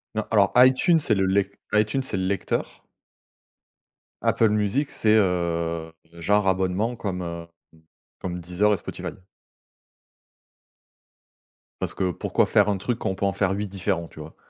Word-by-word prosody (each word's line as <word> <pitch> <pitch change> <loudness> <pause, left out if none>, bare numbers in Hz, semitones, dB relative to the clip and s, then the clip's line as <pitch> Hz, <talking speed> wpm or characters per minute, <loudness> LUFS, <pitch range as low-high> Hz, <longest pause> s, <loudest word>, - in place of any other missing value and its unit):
Non, - - 0
alors - - +4
iTunes 130 +7 +5
c'est 115 - +1
le 95 -1 +1
lec 100 +1 +1 0.2
iTunes 110 +5 +2
c'est 110 -7 -3
le 95 - -1
lecteur 100 +1 -2 1.4
Apple 110 -2 +3
Music 105 +7 0
c'est, 110 0 +3
heu, 85 -4 0 0.2
genre 100 +5 +1
abonnement 95 +5 0
comme, 95 -4 -3
heu, 85 -1 -6 0.3
mmh, 80 - -22 0.4
comme 90 -1 -4
Deezer 95 +5 +1
et - - 0
Spotify. - - -6 2.7
Parce - - -2
que, 90 -1 -1
pourquoi - - 0
faire 105 0 +3
un 100 - +1
truc 120 +5 -3
quand - - -3
on 95 - -2
peut 100 - -2
en 100 - +2
faire 95 0 0
8 100 +1 -2
différents, 95 -3 -2
tu - - -14
vois? - - -10
100 Hz, 155 wpm, -24 LUFS, 90-105 Hz, 2.7 s, iTunes